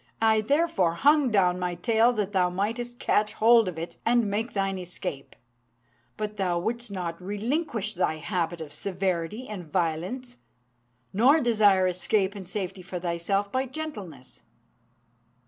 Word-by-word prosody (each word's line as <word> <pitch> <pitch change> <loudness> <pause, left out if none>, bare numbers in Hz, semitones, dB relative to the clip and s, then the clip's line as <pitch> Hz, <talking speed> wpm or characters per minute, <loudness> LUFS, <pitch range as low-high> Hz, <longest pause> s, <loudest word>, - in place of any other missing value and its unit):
I 220 -1 +4
therefore 220 - +1
hung 290 - +4
down 180 -4 +2
my 180 -1 -2
tail 225 +6 +3
that 210 -3 -2
thou 185 -3 +2
mightest 230 +6 -3
catch 210 -3 +1
hold 230 -1 +5
of 180 -3 -4
it 165 +1 -6
and 235 0 +3
make 215 +4 -2
thine 195 -1 -1
escape. 180 -5 -6 0.8
But 210 0 -4
thou 180 -3 0
wouldst 235 +6 -3
not 180 -3 -5
relinquish 220 - -2
thy 175 -3 0
habit 170 0 -2
of 150 -2 -7
severity 185 - -2
and 180 -7 -8
violence, 185 - -2 0.8
nor 255 +10 +5
desire 210 -7 +4
escape 190 +2 +1
and 195 -4 -8
safety 190 -1 -4
for 180 0 -6
thyself 180 +4 -1
by 260 +1 0
gentleness. 210 - -7
200 Hz, 145 wpm, -27 LUFS, 180-230 Hz, 0.8 s, hold